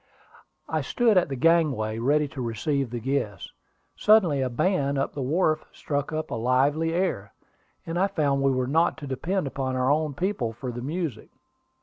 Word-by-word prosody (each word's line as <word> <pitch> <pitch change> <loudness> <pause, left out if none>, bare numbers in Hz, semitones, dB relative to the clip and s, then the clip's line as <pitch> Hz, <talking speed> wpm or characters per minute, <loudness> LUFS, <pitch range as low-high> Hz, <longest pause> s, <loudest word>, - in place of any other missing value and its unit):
I - - -1
stood 235 -3 +2
at 180 -4 +3
the 135 - -3
gangway, 135 -8 +2
ready 145 +5 +2
to 140 -4 -7
receive 125 +3 -1
the 120 +1 -4
guests. 115 -6 -3 0.4
Suddenly 185 -10 +4
a 130 - 0
band 140 +1 0
on 135 - -1
the 140 - -4
wharf 155 +4 +1
struck 145 0 -3
up 155 0 -3
a - - -2
lively 135 +7 +1
air, 165 - -2 0.5
and 165 +1 -2
I 195 - +3
found 145 -8 0
we 135 - +3
were 130 -1 0
not 160 +6 +2
to 155 - -8
depend 165 +7 -2
upon 135 -1 -3
our 130 +1 +2
own 150 -1 0
people 145 - -1
for 125 +2 -5
the 120 0 -6
music. 150 -3 -4
140 Hz, 185 wpm, -26 LUFS, 130-165 Hz, 0.5 s, Suddenly